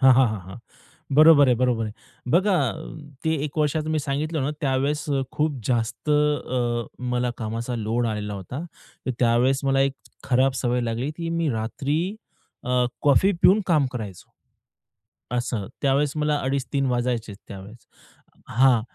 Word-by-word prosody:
हां, 130 -1 +7
हां, 130 0 +5
हां, 105 -2 -4
हां. 95 - -8 0.6
बरोबर 155 -2 +8
आहे, 125 - +5
बरोबर 120 -2 +1
आहे. 105 - -5 0.4
बघा 190 +2 +4 0.7
ते 160 - +2
एक 155 +1 -5
वर्षाचं 155 +1 0
मी 155 - +1
सांगितलं 145 +2 -2
ना, 140 - 0
त्यावेळेस 140 +1 0 0.3
खूप 150 -2 0
जास्त 120 +3 -1
अ, 130 -5 +1
मला 125 -1 -1
कामाचा 115 +2 -3
लोड 115 +2 -1
आलेला 105 -2 -3
होता, 100 - -6 0.5
तर - - +1
त्यावेळेस 125 +3 +3
मला 135 0 +2
एक - - -7 0.3
खराब 130 +1 +3
सवय 125 0 +1
लागली, 120 +4 -2
की 165 -1 -4
मी 160 - +1
रात्री 130 +6 -2 0.7
अ, 125 0 +2 0.2
कॉफी 165 +8 +4
पिऊन 190 +5 +6
काम 155 -6 +3
करायचो 105 -7 -7 1.1
असं. 120 -4 -2 0.2
त्यावेळेस 140 +1 +2
मला 150 0 +1
2:30-3;00 135 0 -1
वाजायचे 120 -3 -1 0.2
त्यावेळेस 100 +4 -11 0.6
हां 125 -1 +4
130 Hz, 145 wpm, -24 LUFS, 120-145 Hz, 1.1 s, बरोबर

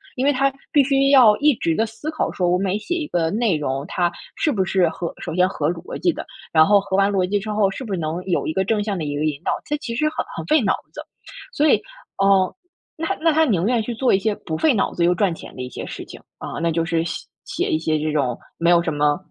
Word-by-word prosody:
因 260 0 -1
为 285 - +4
它 275 +1 +2 0.2
必 285 -2 +6
须 275 0 +2
要 240 -6 +7
一 300 0 +4
直 165 -4 0
地 225 +6 +1
思 225 +8 -6
考 315 - -1
说 180 -2 0
我 180 - +3
每 195 +1 0
写 350 +10 -3
一 315 -4 -3
个 165 -2 0
内 215 -3 +1
容， 140 -1 -2
它 175 -1 0 0.2
是 305 - +1
不 195 -7 0
是 185 -3 +2
合 170 +1 -5
首 - - -5
先 180 0 +4
合 190 - -1
逻 175 0 -7
辑 350 - +2
的， - - -7 0.3
然 160 -1 +6
后 200 +2 +5
合 190 -1 -2
完 200 0 +4
逻 190 -2 +1
辑 205 - +1
之 215 +2 -7
后， 210 -2 +2
是 260 - -7
不 205 - -4
是 180 - -1
能 160 +3 -3
有 180 -3 0
一 - - -1
个 190 +4 0
正 210 0 +1
向 205 -3 -2
的 155 - -3
有 145 - -3
一 - - -3
个 155 - 0
引 150 -2 -2
导， - - 0
这 295 - -1
其 235 -5 -5
实 305 +4 +1
很 - - -4
很 - - -4
费 310 -3 +4
脑 200 - +2 0.2
子。 - - -8 0.5
所 305 -5 +2
以， - - +6 0.4
嗯， 195 -1 +4 0.5
那 325 0 -1
那 325 -1 +4
他 320 +1 +3
宁 190 - +1
愿 240 -2 +2
去 235 +2 -4
做 255 +1 +2
一 195 - +4
些 210 0 0
不 160 -1 -5
费 310 -4 +3
脑 200 - 0
子 170 - +1
又 175 - +4
赚 195 -4 +1
钱 - - -11
的 130 - -6
一 125 - -5
些 - - -7
事 - - -7
情， - - -11 0.2
啊， - - -6
那 170 0 +1
就 165 0 0
是 165 0 0
写 - - -5 0.2
写 - - -2
一 155 - +1
些 155 -1 0
这 155 0 -1
种 130 -5 0 0.2
没 170 +1 +2
有 170 -1 +5
什 160 - -2
么 145 0 +2
195 Hz, 310 characters per minute, -21 LUFS, 165-245 Hz, 0.5 s, 要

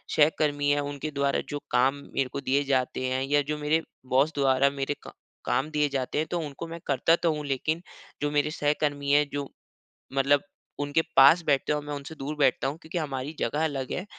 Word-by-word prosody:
सहकर्मी 145 -1 +3
हैं 145 - +2
उनके 145 +1 -4
द्वारा 140 -1 0
जो 145 -1 -3
काम 130 +3 +3 0.2
मेरे 130 -2 0
को - - -2
दिए 140 +2 +1
जाते 130 -1 0
हैं, 130 +1 0
या 145 +1 +2
जो 150 +2 -3
मेरे 150 +2 +1 0.3
बॉस 140 +5 +3
द्वारा 135 0 +3
मेरे 140 +1 -3
क - - -8 0.3
काम 150 +4 0
दिए 150 -1 +2
जाते 135 0 -2
हैं 155 - 0
तो 175 - 0
उनको 145 +3 -7
मैं 165 +1 -7
करता 150 +4 +3
तो 165 - +4
हूँ 150 -1 -5
लेकिन 155 +5 -1 0.4
जो 145 - +1
मेरे 150 +1 +1
सहकर्मी 145 -2 0
हैं 150 +1 +5
जो 145 -1 -2 0.7
मतलब 140 +1 +3 0.4
उनके 145 +2 +1
पास 150 +6 +7
बैठते 140 0 +2
हैं 150 - +2
और 145 - -10
मैं 145 - -4
उनसे 145 +3 -7
दूर 145 +2 -5
बैठता 135 -1 +3
हूँ। 145 +4 -3
क्योंकि 160 +3 -6
हमारी 145 -2 -3
जगह 150 +7 0
अलग 135 -4 -2
है 185 - -3
145 Hz, 210 wpm, -27 LUFS, 135-150 Hz, 0.7 s, पास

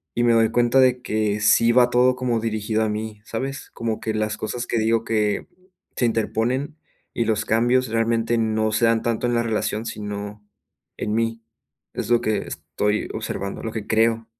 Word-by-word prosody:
y 120 - +1
me 120 - +4
doy 115 -1 +4
cuenta 120 +2 +3
de 125 -1 +4
que 110 -3 -1
sí 110 +3 +4
va 125 0 +5
todo 125 +1 +3
como 125 -2 0
dirigido 110 0 -1
a 110 - 0
mí, 105 0 -5
¿sabes? 135 +5 -5
Como 115 -2 -3
que 110 - -3
las 110 0 -1
cosas 120 +3 -4
que 115 - 0
digo 110 +1 +2
que 105 -3 0 0.5
se 125 - +1
interponen, 120 +5 -1 0.4
y 115 - 0
los 110 -1 0
cambios 120 +3 +2
realmente 115 +1 +1
no 110 -1 +1
se 110 +2 +2
dan 115 -1 +3
tanto 120 +1 -1
en 120 - 0
la 115 - +2
relación, 110 0 -1
sino 105 -1 -6 0.5
en 105 - -2
mí, 115 0 -1 0.5
es 105 - -4
lo 120 -1 +4
que 110 -1 0
estoy 105 +1 -2
observando, 100 0 -4
lo 115 - -3
que 110 -2 -5
creo. 115 0 +2
115 Hz, 190 wpm, -23 LUFS, 110-120 Hz, 0.5 s, va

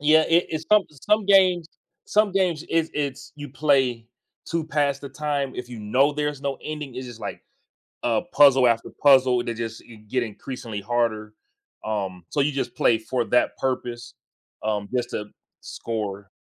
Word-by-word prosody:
Yeah, 155 +2 +5
it 170 +1 +4
it's 160 0 -4
some 210 -1 +7
some 205 - 0
games 185 -4 +4 0.4
some 210 -2 +2
games, 180 -5 +1
it's 165 -1 +1
it's 140 -3 -3
you 145 -1 -7
play 130 -5 +1 0.4
to 165 -1 -1
pass 145 -3 +1
the 140 - -8
time. 145 -2 -2
If 125 0 -6
you 120 -2 -8
know 130 +8 +2
there's 150 -1 -3
no 140 -1 -2
ending, 150 -4 -6
it's 130 0 -6
just, 120 -2 -10
like, - - -6 0.6
a 115 -2 +2
puzzle 135 -3 +6
after 115 -1 +1
puzzle, 130 -3 +5
they 115 - -3
just 115 -1 -5
i 115 - -11
get 110 +4 -2
increasingly 110 -1 -6
harder- 110 -1 -1 0.5
um, 95 -5 -3
so 150 - -2
you 145 +1 +2
just 135 -3 -3
play 115 - +3
for 120 +2 -2
that 125 +2 +1
purpose, 120 -2 -3 0.5
um, 105 -2 -1
just 120 -1 0
to 105 - -4 0.4
score. 100 -3 -5
130 Hz, 170 wpm, -24 LUFS, 115-150 Hz, 0.6 s, some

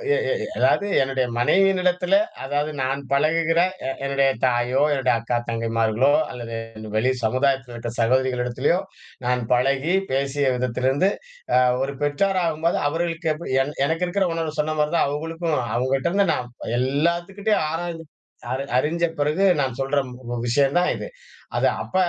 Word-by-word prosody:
எ - - +1
எ - - +3
எ - - -2
அதாவது 200 - +3 0.2
என்னுடைய 135 -1 0
மனைவியினிடத்தில, 180 - +3 0.3
அதாவது 145 +3 -1
நான் 135 +2 -1
பழகுகிற 165 +4 +2 0.3
எ - - 0 0.2
என்னுடைய 140 0 +2 0.2
தாயோ, 125 +2 +1
என்னுடைய 130 -3 +1
அக்கா 120 +1 -1
தங்கைமார்களோ, 115 +2 +1 0.2
அல்லது 115 -2 -6 0.4
வெளி 120 +4 +2
சமுதாயத்தில 130 +2 +1
இருக்கிற 120 0 -5
சகோதரிகளிடத்திலயோ, 125 +5 +1 0.5
நான் 125 0 +1
பழகி 135 +6 +1 0.2
பேசிய 135 0 +1
விதத்திலிருந்து 125 +7 +1 0.5
அ - - +6 0.2
ஒரு 140 +1 -3
பெற்றோரகும்போது 165 +1 +1
அவர்களுக்கு 165 0 -1
எப்டி 155 -4 -4
என் 145 +2 -6
எனக்கு 165 +4 0
இருக்கிற 190 +1 +1
உணர்வு 160 -2 -3
சொன்ன 155 +1 0
மாதிரி 150 +2 +1
தான் 155 - +3
அவுங்களுக்கும். 165 +2 -2 0.2
அவுங்க 130 +2 0
கிட்டேருந்து. 190 +8 +1
நான் 125 -4 -4 0.3
எல்லாத்துக்கிட்டேயும் 170 - 0
ஆராய்ந்து 165 0 -4 0.5
அறி 130 +1 -1 0.2
அறிஞ்ச 170 +5 0 0.2
பிறகு 155 +7 +2 0.2
நான் 130 -2 -2
சொல்ற 135 +2 -1
ம் 120 -1 -6
விஷயம் 140 +5 +2
தான் 180 - +2
இது. - - -6 0.5
அது - - +3 0.2
அப்ப - - -11
140 Hz, 145 wpm, -23 LUFS, 125-165 Hz, 0.5 s, அ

